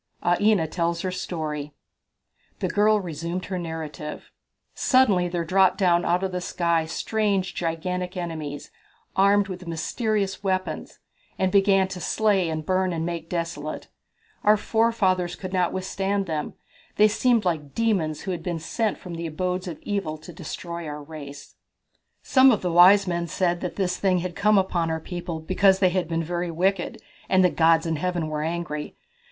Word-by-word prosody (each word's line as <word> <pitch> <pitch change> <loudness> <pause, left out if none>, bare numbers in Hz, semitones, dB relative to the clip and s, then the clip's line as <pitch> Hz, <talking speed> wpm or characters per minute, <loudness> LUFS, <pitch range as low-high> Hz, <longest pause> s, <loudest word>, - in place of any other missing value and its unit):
Aina 185 +1 +3
Tells 170 +1 -1
Her 185 - -2
Story. 150 -5 -4 0.8
The - - -1
girl 210 +1 +3
resumed 170 0 -4
her 185 -1 -3
narrative: 160 -2 -6 0.4
"Suddenly 215 -10 +3
there 175 -1 -2
dropped 190 +2 +3
down 175 -2 +3
out 175 +2 +1
of 190 - -1
the 180 0 -3
sky 170 -2 0
strange 200 0 -1
gigantic 180 +2 -3
enemies, 155 -5 -5 0.4
armed 200 +1 +4
with 180 -2 -7
mysterious 200 +4 -2
weapons, 185 -1 -2 0.4
and 190 -1 +1
began 195 -1 +4
to 185 -1 -6
slay 200 -3 +1
and 155 -1 -3
burn 185 0 +1
and 165 -1 -2
make 170 -1 -4
desolate. 165 -3 -4 0.5
Our 210 +1 +5
forefathers 200 -6 +1
could 185 -1 -7
not 180 -2 +2
withstand 195 +1 -1
them. 155 -3 -3 0.4
They 210 - +6
seemed 230 0 +2
like 155 -5 -2
demons, 190 -10 0
who 190 - -4
had 175 -2 -4
been 175 0 -3
sent 210 +7 -1
from 180 - -9
the 170 0 -4
abodes 180 +3 -2
of 165 -4 -5
evil 195 -7 -2
to 170 +3 -12
destroy 170 0 -6
our 150 0 -6
race." 145 -2 -10 0.7
"Some 265 0 +6
of 220 -7 +2
the 180 - 0
wise 185 +4 +7
men 170 -2 -2
said 175 +1 0
that 180 - -4
this 180 -2 -1
thing 190 -2 +2
had 175 0 -3
come 210 +1 +3
upon 180 -3 +1
our 160 0 -1
people 170 -1 -5
because 190 +4 +3
they 185 -1 +4
had 180 -2 -1
been 165 0 -1
very 175 +1 -2
wicked, 180 +2 -1 0.3
and 185 -1 +5
the 180 - +3
gods 165 0 +4
in 165 -1 -1
Heaven 175 -1 -2
were 150 -1 -2
angry. 155 -2 -4
180 Hz, 170 wpm, -25 LUFS, 165-195 Hz, 0.8 s, wise